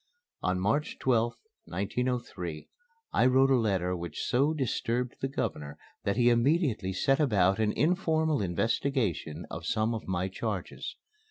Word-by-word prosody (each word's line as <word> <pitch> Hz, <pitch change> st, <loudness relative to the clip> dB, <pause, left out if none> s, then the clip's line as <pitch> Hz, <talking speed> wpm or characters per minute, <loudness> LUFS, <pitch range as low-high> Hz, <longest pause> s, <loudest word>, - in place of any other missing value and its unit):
On 90 Hz, 0 st, 0 dB
March 110 Hz, +11 st, 0 dB
12th, 120 Hz, -2 st, +1 dB, 0.3 s
1903, 100 Hz, -6 st, -3 dB, 0.5 s
I -, -, +4 dB
wrote 135 Hz, +1 st, +4 dB
a -, -, +6 dB
letter 95 Hz, -6 st, +1 dB
which 85 Hz, -3 st, -5 dB
so 140 Hz, +5 st, +2 dB
disturbed 125 Hz, -4 st, -1 dB
the 135 Hz, -, +1 dB
Governor 75 Hz, -, -4 dB, 0.3 s
that 100 Hz, +2 st, 0 dB
he 120 Hz, -1 st, +5 dB
immediately 120 Hz, -, +2 dB
set 135 Hz, +9 st, +2 dB
about 100 Hz, -9 st, +3 dB
an 110 Hz, -1 st, +2 dB
informal 160 Hz, -, +1 dB
investigation 95 Hz, -, -1 dB
of 80 Hz, +1 st, -5 dB
some 110 Hz, +1 st, +1 dB
of 110 Hz, -, -5 dB
my 95 Hz, 0 st, 0 dB
charges. 95 Hz, -, -4 dB
115 Hz, 140 wpm, -29 LUFS, 95-135 Hz, 0.5 s, a